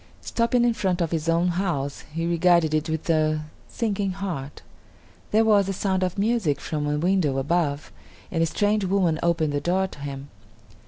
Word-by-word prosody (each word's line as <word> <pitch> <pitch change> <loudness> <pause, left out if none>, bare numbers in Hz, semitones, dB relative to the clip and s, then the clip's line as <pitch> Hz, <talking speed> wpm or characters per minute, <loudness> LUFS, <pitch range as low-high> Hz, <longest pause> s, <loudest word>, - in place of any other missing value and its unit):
Stopping 235 +1 +1
in 240 - +3
front 190 -5 -1
of 170 -3 -1
his 165 0 -1
own 170 +2 +2
house, 170 -6 -2
he 165 +2 -2
regarded 170 -2 +3
it 155 +1 0
with 160 -1 -3
a 155 -2 +1 0.2
sinking 200 -4 -2
heart. 175 -8 -5 0.7
There 220 +1 +3
was 205 -3 +4
the 195 - -1
sound 190 0 -1
of 185 0 -1
music 200 -8 +1
from 150 -2 -3
a 150 0 0
window 170 -4 +1
above, 145 0 -1 0.4
and 165 - 0
a 165 - +3
strange 205 +4 +1
woman 185 -4 +1
opened 165 -3 +1
the 145 - -1
door 185 +5 +1
to 185 - -10
him. 140 0 -6
170 Hz, 180 wpm, -24 LUFS, 155-195 Hz, 0.7 s, was